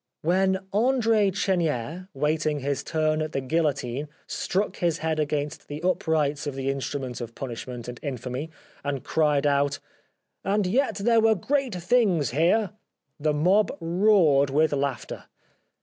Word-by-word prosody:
When 190 Hz, +3 st, +2 dB
Andre 225 Hz, -2 st, +3 dB
Chenier 175 Hz, -, -1 dB
waiting 150 Hz, +1 st, 0 dB
his 140 Hz, 0 st, -2 dB
turn 155 Hz, -1 st, 0 dB
at 155 Hz, 0 st, -3 dB
the -, -, 0 dB
guillotine 145 Hz, -2 st, -1 dB, 0.2 s
struck 200 Hz, +3 st, -2 dB
his 170 Hz, -2 st, +1 dB
head 160 Hz, -1 st, -1 dB
against 150 Hz, -1 st, -2 dB
the 150 Hz, +3 st, -7 dB
uprights 160 Hz, -5 st, 0 dB
of 140 Hz, -, -3 dB
the 135 Hz, 0 st, -1 dB
in 135 Hz, -, -3 dB
strument 130 Hz, -3 st, -4 dB
of 115 Hz, -1 st, -7 dB
punishment 120 Hz, -1 st, -6 dB
and 125 Hz, 0 st, -7 dB
infamy 130 Hz, +1 st, -4 dB, 0.3 s
and 140 Hz, -2 st, -3 dB
cried 150 Hz, -3 st, +2 dB
out: 140 Hz, 0 st, +2 dB, 0.4 s
" -, -, -52 dB, 0.2 s
And 200 Hz, +1 st, +1 dB
yet 230 Hz, +4 st, +1 dB
there 225 Hz, +3 st, +3 dB
were 220 Hz, 0 st, +4 dB
great 265 Hz, +2 st, -1 dB
things 180 Hz, -, +2 dB
here! 180 Hz, -, +2 dB, 0.2 s
" -, -, -60 dB
the 155 Hz, +1 st, +1 dB
mob 190 Hz, +7 st, +2 dB
roared 165 Hz, -5 st, +4 dB
with 150 Hz, +2 st, +2 dB
laughter. 140 Hz, -3 st, -3 dB
155 Hz, 150 wpm, -26 LUFS, 140-190 Hz, 0.4 s, were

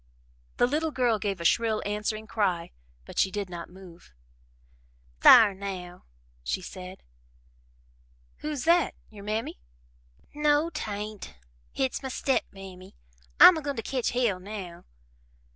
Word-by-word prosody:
The -, -, +4 dB
little 305 Hz, +5 st, 0 dB
girl 245 Hz, -6 st, +1 dB
gave 195 Hz, -2 st, -2 dB
a 170 Hz, -, -6 dB
shrill 220 Hz, +4 st, +2 dB
answering 210 Hz, +1 st, -3 dB
cry, 185 Hz, -7 st, -1 dB, 0.3 s
but -, -, -6 dB
she 190 Hz, -, +3 dB
did 195 Hz, -1 st, -5 dB
not 170 Hz, -1 st, -7 dB
move. 180 Hz, -, -15 dB, 1.1 s
"Thar 210 Hz, -, +8 dB
now!" 190 Hz, -2 st, -7 dB, 0.4 s
she -, -, -2 dB
said. 185 Hz, +1 st, -10 dB, 1.3 s
"Who's 300 Hz, -4 st, -4 dB
that 340 Hz, +1 st, +3 dB, 0.2 s
your 205 Hz, -2 st, -12 dB
Mammy?" 215 Hz, -, -3 dB, 0.7 s
"No, 300 Hz, +2 st, +2 dB
'tain't 210 Hz, -, -6 dB, 0.4 s
hit's 265 Hz, -1 st, -2 dB
my 265 Hz, -, -5 dB
step 265 Hz, +1 st, 0 dB
mammy. 190 Hz, -1 st, -12 dB, 0.4 s
I'm 360 Hz, -, +10 dB
a -, -, -4 dB
goin' 285 Hz, -1 st, -3 dB
to 225 Hz, -, -4 dB
ketch 255 Hz, 0 st, -1 dB
hell 235 Hz, -7 st, 0 dB
now." 185 Hz, -3 st, -8 dB
210 Hz, 130 wpm, -27 LUFS, 185-255 Hz, 1.3 s, I'm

